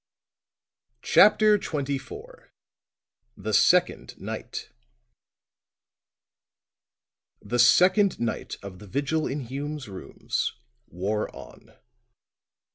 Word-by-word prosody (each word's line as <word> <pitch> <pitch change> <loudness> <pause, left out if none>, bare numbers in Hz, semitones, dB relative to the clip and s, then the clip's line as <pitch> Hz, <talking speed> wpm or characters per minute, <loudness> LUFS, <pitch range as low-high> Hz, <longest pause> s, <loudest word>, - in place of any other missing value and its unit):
CHAPTER 210 0 +5
XXIV 165 - -6 0.9
THE - - -4
SECOND - - +2
NIGHT - - -7 2.7
The 120 +4 -3
second 185 - +5
night 120 -1 -3
of 95 -2 -9
the 105 - -12
vigil 145 +8 -1
in 145 +1 -3
Hume's 140 +2 -6
rooms 95 -2 -4 0.3
wore 100 +5 -3
on. - - -14
140 Hz, 75 wpm, -26 LUFS, 115-185 Hz, 2.7 s, CHAPTER